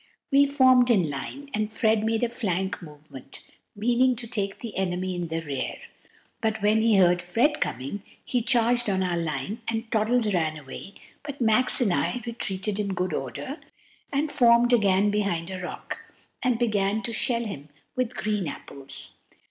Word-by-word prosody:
We 280 +1 +5
formed 260 -3 +5
in 185 -10 +3
line, 280 - -7
and 215 0 -1
Fred 220 -1 +2
made 225 +1 0
a 240 - +2
flank 190 -5 -2
movement, 150 -4 -11 0.3
meaning 245 +4 +2
to 235 +1 -2
take 200 -4 -2
the 230 -3 -8
enemy 185 0 -1
in 175 -1 -3
the 165 0 -3
rear; 140 -4 -4 0.6
but 220 0 0
when 215 +1 +4
he 225 -1 +4
heard 175 -1 +4
Fred 230 - +1
coming, 135 - -3 0.2
he 245 - 0
charged 240 -1 +2
on 190 -1 +1
our 180 -1 0
line, 165 - -3
and 225 0 -3
Toddles 220 0 +2
ran 160 -3 0
away, 150 +7 -10 0.3
but 285 -1 -7
Max 235 +1 +4
and 205 -7 +3
I 140 +12 0
retreated 210 -3 -2
in 200 -2 -1
good 180 -1 -1
order, 145 - -5 0.5
and 290 +2 0
formed 240 -1 +5
again 205 -2 +4
behind 190 -4 -1
a 185 -1 -5
rock, 175 - -6 0.4
and 250 -3 +1
began 215 -2 0
to 230 - -2
shell 235 +1 +1
him 150 -8 -7 0.3
with 255 -2 -1
green 210 -4 -1
apples. 140 -1 -5
210 Hz, 170 wpm, -26 LUFS, 180-240 Hz, 0.6 s, We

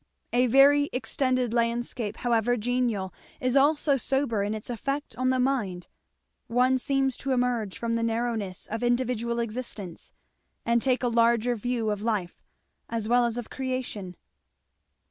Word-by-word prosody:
A 250 +1 +4
very 285 +3 +5
extended 255 0 0
landscape 235 -2 -1
however 240 0 +1
genial 230 -5 -1 0.3
is 255 0 0
also 285 0 +4
sober 265 -4 0
in 205 +2 -1
its 215 - -5
effect 275 +2 -3
on 255 +2 0
the 260 - +2
mind. 215 -10 0 0.6
One 255 +2 +3
seems 270 -1 +1
to 270 -1 -1
emerge 245 -5 0
from 230 -1 -2
the 230 - 0
narrowness 225 -4 -2
of 225 +2 -4
individual 240 -1 0
existence, 225 -6 -5 0.5
and 235 0 +2
take 255 0 +1
a - - +2
larger 235 0 +3
view 230 -1 -1
of 205 -1 -3
Life 210 -6 -2 0.5
as 225 -2 -2
well 240 +1 +4
as 235 0 -3
of 240 - -6
Creation. 255 -8 -4
240 Hz, 145 wpm, -27 LUFS, 225-255 Hz, 0.6 s, very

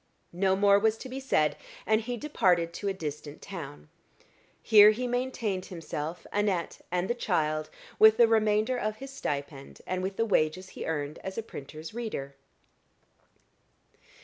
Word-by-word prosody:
No 190 +2 +2
more 200 0 +5
was 220 +1 +2
to 260 - -9
be 260 +1 -5
said, 155 - +1 0.3
and 220 0 +3
he 245 +2 -4
departed 180 - +1
to 200 - -4
a - - +2
distant 150 -4 -6
town. 140 - -8 0.8
Here 210 -1 +8
he 230 +4 0
maintained 245 -6 -2
himself, 165 -1 -6
Annette 200 -4 -1
and 180 +1 0
the 240 - +1
child, 155 -9 -1 0.3
with 220 0 +8
the 235 -1 +7
remainder 220 +2 +2
of 215 -1 -2
his 270 +4 -9
stipend, 140 - -5
and 185 0 -2
with 190 +1 -3
the 225 - +2
wages 185 -2 +1
he - - -7
earned 150 -1 -3
as 190 0 -7
a 225 - -2
printer's 155 -2 -9
reader. 215 -13 -5
195 Hz, 155 wpm, -28 LUFS, 155-220 Hz, 0.8 s, Here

